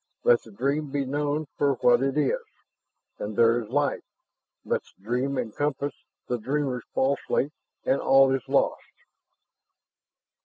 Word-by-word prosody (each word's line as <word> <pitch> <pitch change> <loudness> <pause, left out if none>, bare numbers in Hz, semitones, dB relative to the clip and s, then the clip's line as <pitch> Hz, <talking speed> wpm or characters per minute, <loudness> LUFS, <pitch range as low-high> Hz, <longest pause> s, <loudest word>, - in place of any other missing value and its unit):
Let 120 -1 +5
the - - -15
dream 140 +7 -1
be 140 0 -1
known 145 +3 -1
for 140 -1 +3
what 120 0 +4
it 135 +1 0
is, 145 -3 +2 0.8
and 105 0 -4
there 115 +1 +4
is 110 - -10
life. 145 +3 +1 0.6
Let - - 0 0.2
the - - -28
dream 125 +5 -1
encompass 140 +4 -2 0.3
the 125 - -1
dreamer 135 +1 -1
falsely, 140 +1 +1 0.3
and 135 - +2
all 135 0 +5
is 135 -4 -3
lost." - - +2
135 Hz, 140 wpm, -26 LUFS, 120-145 Hz, 0.8 s, Let